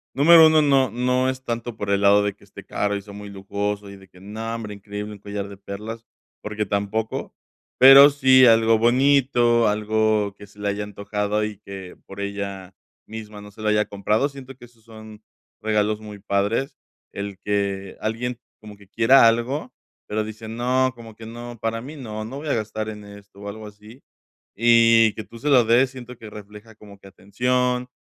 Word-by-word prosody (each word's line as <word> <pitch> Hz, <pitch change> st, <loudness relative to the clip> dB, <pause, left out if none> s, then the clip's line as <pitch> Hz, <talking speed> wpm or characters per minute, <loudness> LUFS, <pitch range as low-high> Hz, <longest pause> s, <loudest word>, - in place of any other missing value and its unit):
Número 160 Hz, +3 st, +8 dB
1, 155 Hz, -1 st, +4 dB
no 135 Hz, -3 st, +3 dB
no 125 Hz, +3 st, 0 dB
es 130 Hz, 0 st, -5 dB
tanto 115 Hz, -1 st, -5 dB
por 100 Hz, -1 st, -3 dB
el 100 Hz, 0 st, +1 dB
lado 100 Hz, +1 st, +5 dB
de 105 Hz, -1 st, -1 dB
que -, -, -25 dB
esté -, -, -13 dB
caro, 105 Hz, 0 st, -2 dB
y 100 Hz, -, -4 dB
sea 100 Hz, -, -12 dB
muy 105 Hz, 0 st, -9 dB
lujoso 100 Hz, +1 st, -4 dB
y 100 Hz, -, -11 dB
de 95 Hz, 0 st, -17 dB
que, 90 Hz, -, -20 dB
no, 110 Hz, +4 st, -6 dB
hombre, 110 Hz, -2 st, -6 dB
increíble, 105 Hz, +1 st, -7 dB
un 100 Hz, -, -12 dB
collar 100 Hz, 0 st, -6 dB
de 100 Hz, 0 st, -11 dB
perlas, 105 Hz, +4 st, -8 dB, 0.3 s
porque 105 Hz, 0 st, -3 dB
tampoco. 100 Hz, +3 st, -3 dB, 0.4 s
Pero 135 Hz, +2 st, +9 dB
sí, 130 Hz, -2 st, +5 dB
algo 115 Hz, -1 st, +5 dB
bonito, 120 Hz, -1 st, +3 dB
algo 105 Hz, -1 st, 0 dB
que 105 Hz, -, -13 dB
se 100 Hz, -, -23 dB
le 105 Hz, -, -2 dB
haya 100 Hz, +1 st, -3 dB
antojado 105 Hz, +1 st, -3 dB
y 105 Hz, -1 st, -6 dB
que 95 Hz, -3 st, -10 dB
por 95 Hz, -, -11 dB
ella 100 Hz, -2 st, -5 dB, 0.3 s
misma 110 Hz, -1 st, -9 dB
no 105 Hz, 0 st, -12 dB
se 110 Hz, +2 st, -14 dB
lo 110 Hz, -, -2 dB
haya 105 Hz, 0 st, +2 dB
comprado. 105 Hz, +6 st, 0 dB
Siento 135 Hz, -2 st, -11 dB
que 120 Hz, -, -13 dB
esos 115 Hz, -2 st, -24 dB
son 110 Hz, -1 st, -13 dB, 0.4 s
regalos 105 Hz, 0 st, 0 dB
muy 105 Hz, -1 st, -10 dB
padres, 100 Hz, +6 st, -1 dB, 0.4 s
el 100 Hz, -1 st, -6 dB
que 100 Hz, -2 st, -2 dB
alguien 120 Hz, +2 st, -3 dB, 0.2 s
como 105 Hz, -1 st, -12 dB
que 100 Hz, -1 st, -20 dB
quiera 115 Hz, +3 st, +5 dB
algo, 120 Hz, +5 st, -1 dB, 0.4 s
pero 110 Hz, +1 st, -2 dB
dice: 110 Hz, +1 st, -9 dB
"No, 125 Hz, +3 st, 0 dB
como 115 Hz, -2 st, -12 dB
que 110 Hz, 0 st, -11 dB
no, 120 Hz, 0 st, -9 dB
para 115 Hz, 0 st, -2 dB
mí 145 Hz, +5 st, -9 dB
no, 110 Hz, -6 st, -7 dB
no 130 Hz, +5 st, -7 dB
voy 155 Hz, -, -7 dB
a 140 Hz, -, +1 dB
gastar 110 Hz, 0 st, -4 dB
en 105 Hz, -1 st, -9 dB
esto", 100 Hz, -1 st, -15 dB
o 100 Hz, -, -8 dB
algo 110 Hz, +1 st, -9 dB
así. 105 Hz, +5 st, -15 dB, 0.5 s
Y 115 Hz, -1 st, +5 dB
que 110 Hz, -, -6 dB
tú 115 Hz, +2 st, -14 dB
se 145 Hz, -, -5 dB
lo 130 Hz, -3 st, +6 dB
des, 125 Hz, +3 st, +3 dB
siento 125 Hz, -2 st, -11 dB
que 110 Hz, -, -11 dB
refleja 105 Hz, +1 st, -13 dB
como 100 Hz, -2 st, -15 dB
que 100 Hz, -, -15 dB
atención, 125 Hz, +6 st, -1 dB
110 Hz, 200 wpm, -22 LUFS, 100-120 Hz, 0.5 s, Pero